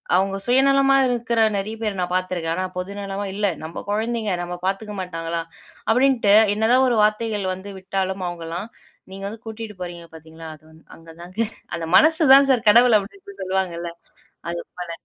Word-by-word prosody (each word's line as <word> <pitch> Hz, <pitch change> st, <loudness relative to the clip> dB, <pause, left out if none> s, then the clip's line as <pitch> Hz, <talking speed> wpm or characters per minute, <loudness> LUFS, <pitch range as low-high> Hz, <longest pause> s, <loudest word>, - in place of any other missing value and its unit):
அவுங்க 195 Hz, +1 st, +1 dB
சுயநலமா 270 Hz, +2 st, +4 dB
இருக்குற 240 Hz, -1 st, -1 dB, 0.2 s
நிறைய 210 Hz, +3 st, -4 dB
பேர 210 Hz, -2 st, -1 dB
நான் 180 Hz, 0 st, -2 dB
பாத்துருக்கேன், 180 Hz, -3 st, -2 dB
ஆனா 185 Hz, -, -2 dB
பொது 180 Hz, +2 st, -5 dB
நலமா 200 Hz, 0 st, -4 dB
இல்ல 205 Hz, +1 st, -1 dB, 0.2 s
"நம்ப 160 Hz, -, -7 dB
கொழந்தைங்க 220 Hz, 0 st, -1 dB
நம்ப 175 Hz, 0 st, -5 dB
பாத்துக்க 200 Hz, +2 st, -2 dB
மாட்டாங்களா" 165 Hz, -2 st, -4 dB, 0.5 s
அப்டின்னுட்டு 250 Hz, -4 st, +3 dB, 0.2 s
என்னதான் 245 Hz, +5 st, +3 dB
ஒரு 240 Hz, -, +1 dB
வார்த்தைகள் 215 Hz, -1 st, 0 dB
வந்து 190 Hz, +2 st, -9 dB
விட்டாலும், 190 Hz, 0 st, -3 dB
அவுங்கலாம் 175 Hz, +3 st, -5 dB, 0.4 s
நீங்க 195 Hz, 0 st, -8 dB
வந்து 220 Hz, +2 st, -8 dB
கூட்டிட்டு 220 Hz, -1 st, -7 dB
போறீங்க 175 Hz, -1 st, -7 dB
பாத்தீங்களா, 160 Hz, 0 st, -12 dB
அது 155 Hz, -, -24 dB
வந்து 160 Hz, 0 st, -20 dB
அங்க 165 Hz, 0 st, -16 dB
தாங்க 180 Hz, +4 st, -11 dB, 0.4 s
"அந்த 165 Hz, -1 st, -4 dB
மனசு 320 Hz, -, +5 dB
தான் 275 Hz, 0 st, +7 dB
சார் 240 Hz, -4 st, +2 dB
கடவுள்" 235 Hz, +1 st, +6 dB
அப்டின்னு 395 Hz, -, -12 dB
சொல்லுவாங்கல்ல, 185 Hz, -2 st, -2 dB, 0.6 s
அது 170 Hz, 0 st, -4 dB, 0.2 s
போல. 175 Hz, -1 st, -6 dB
195 Hz, 165 wpm, -22 LUFS, 180-230 Hz, 0.6 s, தான்